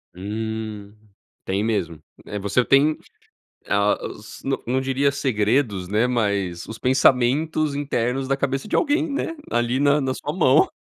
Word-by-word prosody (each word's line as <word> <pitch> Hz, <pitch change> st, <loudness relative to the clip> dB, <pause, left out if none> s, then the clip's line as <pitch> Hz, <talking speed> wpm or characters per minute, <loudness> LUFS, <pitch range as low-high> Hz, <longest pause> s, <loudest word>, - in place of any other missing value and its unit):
Hum, 105 Hz, +1 st, -5 dB, 0.5 s
tem 95 Hz, +2 st, -1 dB
mesmo. 90 Hz, -8 st, -2 dB, 0.2 s
Eh, 105 Hz, -, -5 dB
você 100 Hz, +5 st, +1 dB
tem 140 Hz, +4 st, +4 dB, 0.7 s
a 100 Hz, 0 st, +2 dB
os 105 Hz, 0 st, -10 dB
n 135 Hz, 0 st, 0 dB
não 130 Hz, +2 st, +1 dB
diria 135 Hz, +1 st, +1 dB
segredos, 110 Hz, -6 st, 0 dB
né, 105 Hz, +5 st, +2 dB
mas 100 Hz, -8 st, -1 dB
os 110 Hz, -, -8 dB
pensamentos 135 Hz, +4 st, +2 dB
internos 135 Hz, -2 st, -1 dB
da 135 Hz, -, +1 dB
cabeça 135 Hz, +5 st, -2 dB
de -, -, +1 dB
alguém, 310 Hz, 0 st, +1 dB
né, 290 Hz, +4 st, -2 dB, 0.2 s
ali 120 Hz, +2 st, +1 dB
na 145 Hz, +1 st, +4 dB
na 130 Hz, -1 st, -1 dB
sua 145 Hz, -, -4 dB
mão, 155 Hz, -5 st, +4 dB
125 Hz, 150 wpm, -23 LUFS, 105-140 Hz, 0.7 s, tem